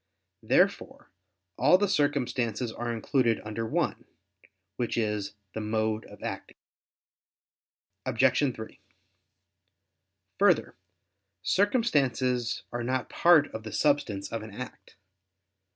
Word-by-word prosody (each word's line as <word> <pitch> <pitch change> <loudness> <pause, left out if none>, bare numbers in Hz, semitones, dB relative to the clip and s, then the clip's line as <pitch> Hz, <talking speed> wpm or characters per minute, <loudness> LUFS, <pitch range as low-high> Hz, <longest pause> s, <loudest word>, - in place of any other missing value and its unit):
Therefore - - +1 0.5
all 150 +8 +6
the 205 +1 +1
circumstances 125 - 0
are 120 +1 -4
included 115 +1 +1
under 110 +1 -3
one, - - -1 0.7
which 120 +1 -2
is 105 -3 -1 0.2
the 110 - -4
"mode 110 0 -1
of - - -13
acting." - - -6 1.5
Obj. 135 -5 +2
3: 110 0 -9 1.6
Further, - - +3 0.7
circumstances 135 - +1
are 120 - -3
not 130 +1 -2
part 170 -4 +5
of 110 - -5
the 110 0 -8
substance 130 -10 0
of 115 - -3
an 110 - -8
act. 125 +2 -9
120 Hz, 105 wpm, -28 LUFS, 110-145 Hz, 1.6 s, all